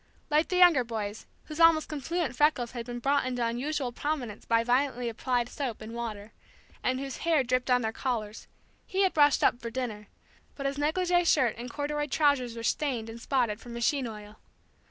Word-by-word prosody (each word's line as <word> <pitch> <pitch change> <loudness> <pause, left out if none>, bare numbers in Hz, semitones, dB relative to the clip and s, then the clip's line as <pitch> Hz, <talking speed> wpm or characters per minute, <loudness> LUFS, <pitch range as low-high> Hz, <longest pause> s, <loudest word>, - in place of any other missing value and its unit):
Like 305 +2 +3
the 365 - -2
younger 350 -8 +6
boys, 220 -3 -5 0.2
whose 305 +1 -8
almost 330 -2 +5
confluent 305 -1 -2
freckles 255 -4 +2
had 235 -1 -6
been 240 0 -5
brought 280 +4 +1
into 250 -2 -1
unusual 255 +3 -2
prominence 250 -5 -4
by 230 0 +2
violently 245 0 +1
applied 240 +1 -1
soap 250 -4 -4
and 220 +1 -8
water, 225 -2 -6 0.5
and 255 0 0
whose 270 -1 -5
hair 325 -5 +2
dripped 255 +1 0
on 250 -1 +3
their 220 - -1
collars, 225 -4 -4 0.4
he 390 +1 +1
had 380 - +2
brushed 290 -2 +4
up 240 - +3
for 230 - -4
dinner, 225 -4 -4 0.5
but 275 - -6
his 275 +1 -1
negligee 350 +4 +2
shirt 265 -8 +3
and 240 +2 -7
corduroy 295 +2 -2
trousers 280 -5 +1
were 230 - -6
stained 235 -4 -1
and 230 +1 -10
spotted 235 -6 0
from 240 +1 -10
machine 245 +3 0
oil. 210 -1 -10
255 Hz, 190 wpm, -28 LUFS, 230-295 Hz, 0.5 s, younger